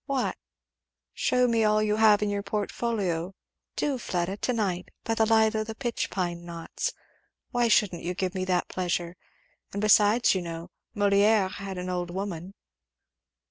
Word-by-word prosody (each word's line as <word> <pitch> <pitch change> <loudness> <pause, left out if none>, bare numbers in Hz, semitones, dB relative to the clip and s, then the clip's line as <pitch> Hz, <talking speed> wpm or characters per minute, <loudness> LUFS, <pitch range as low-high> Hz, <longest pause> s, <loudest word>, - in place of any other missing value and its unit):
"What?" 275 -3 0 0.8
"Shew 250 0 +2
me 230 -2 +2
all 215 0 +3
you 210 0 +1
have 215 -1 +5
in 205 - 0
your 200 0 -1
portfolio 200 -4 -2 0.4
Do, 280 -3 -1
Fleda 180 -1 -2
to 250 - -1
night, 195 -6 -1
by 225 - 0
the 225 -1 +2
light 220 0 +4
of 215 0 -2
the 220 - -5
pitch 240 -2 -2
pine 175 -2 -3
knots. 170 - -4 0.6
Why 240 -1 +2
shouldn't 200 -6 +2
you 180 +2 -3
give 185 0 -2
me 185 -1 -2
that 180 -1 0
pleasure? 175 -1 -2 0.6
And 200 - -3
besides, 210 +2 +5
you 190 - -1
know 170 +1 -7 0.2
Molière 205 -1 +3
had 195 -1 -6
an 180 0 -4
old 175 -1 -2
woman?" 190 0 -5
200 Hz, 165 wpm, -27 LUFS, 180-220 Hz, 0.8 s, have